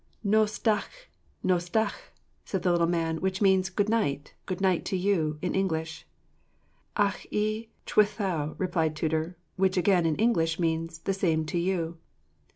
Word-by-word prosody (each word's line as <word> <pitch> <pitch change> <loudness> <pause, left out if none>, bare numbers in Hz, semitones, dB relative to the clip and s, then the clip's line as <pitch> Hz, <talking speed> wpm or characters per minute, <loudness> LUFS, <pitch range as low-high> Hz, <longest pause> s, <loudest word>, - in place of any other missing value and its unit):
"Nos 215 +1 +2
da'ch', 250 - -1 0.3
nos 175 -1 +1
da'ch'," 220 - -1 0.3
said 190 - -3
the 180 - +3
little 170 -1 +3
man, 165 -2 -1
which 190 +1 -1
means 190 -2 +3
"Good 200 +2 0
night, 145 -11 0
good 185 - -3
night 190 -3 +2
to 190 - -1
you," 175 -5 +1
in 180 - 0
English. 160 -4 -2 0.9
"Ac 205 -2 0
i 215 +2 -1 0.2
chwithau," 190 -8 +1
replied 165 -4 0
Tudur; 160 +2 -1 0.2
which 190 0 +2
again, 180 -2 +3
in 155 - +1
English, 165 -7 +1
means 165 -1 -1
"The 195 +4 -2
same 165 -5 +1
to 175 +3 -1
you." 170 -2 -1
180 Hz, 155 wpm, -28 LUFS, 165-200 Hz, 0.9 s, the